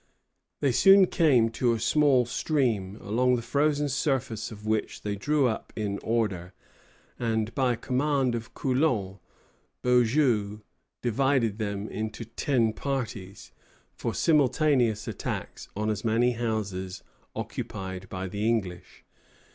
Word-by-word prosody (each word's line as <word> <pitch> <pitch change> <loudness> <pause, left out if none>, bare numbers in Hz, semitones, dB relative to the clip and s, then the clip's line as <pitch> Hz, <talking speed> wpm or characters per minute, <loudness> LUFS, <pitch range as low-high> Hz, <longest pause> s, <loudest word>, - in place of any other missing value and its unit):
They 140 - +3
soon 195 +9 +7
came 135 -11 +3
to 120 +1 +1
a 115 - -2
small 130 +1 +3
stream, 120 -6 -1
along 125 +4 +2
the 120 - -3
frozen 145 +4 +1
surface 135 -6 -1
of 105 -1 -10
which 110 0 -2
they 105 -1 -2
drew 145 +7 +1
up 110 - -4
in 100 -2 -2
order, 100 -6 -1 0.7
and, 110 -1 -1
by 125 -2 +1
command 130 +1 0
of 115 -1 -6
Coulon, 125 -8 0 0.6
Beaujen 120 -4 +2 0.4
divided 120 -2 +1
them 100 -2 -2
all - - -7
into 110 +2 -4
ten 115 -1 0
parties, 115 -9 -5 0.4
for - - -4
simultaneous 135 -7 +2
attacks - - -5
on 105 +1 -1
as 105 - -4
many 115 +2 +2
houses 100 -6 -3 0.3
occupied 95 0 -5
by 95 0 -4
the 105 +3 -2
English. 95 -7 -3
115 Hz, 125 wpm, -27 LUFS, 105-130 Hz, 0.7 s, soon